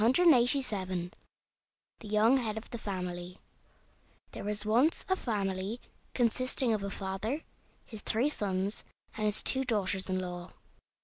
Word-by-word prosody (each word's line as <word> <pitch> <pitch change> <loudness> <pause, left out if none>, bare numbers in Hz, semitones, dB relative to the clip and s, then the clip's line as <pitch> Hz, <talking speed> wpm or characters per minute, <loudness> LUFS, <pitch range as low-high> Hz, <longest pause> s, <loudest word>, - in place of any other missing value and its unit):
THE 235 - +3 1.0
YOUNG 215 +5 +4
HEAD 220 -4 -2
OF 220 - -8
THE 235 - -5
FAMILY 180 -3 -4 0.9
There - - -7
was 210 +1 -2
once 245 +9 +3
a 375 - +3
family 200 - -2 0.4
consisting 250 0 +2
of 215 - 0
a 200 - -3
father, 195 +9 -3 0.4
his 220 -3 -8
three 235 +8 +3
sons, 200 -5 -1 0.3
and 215 -1 0
his 210 - 0
two 265 0 +4
daughters 200 -6 -1
in 185 - +1
law. 180 -1 -5
210 Hz, 130 wpm, -31 LUFS, 190-245 Hz, 1.0 s, YOUNG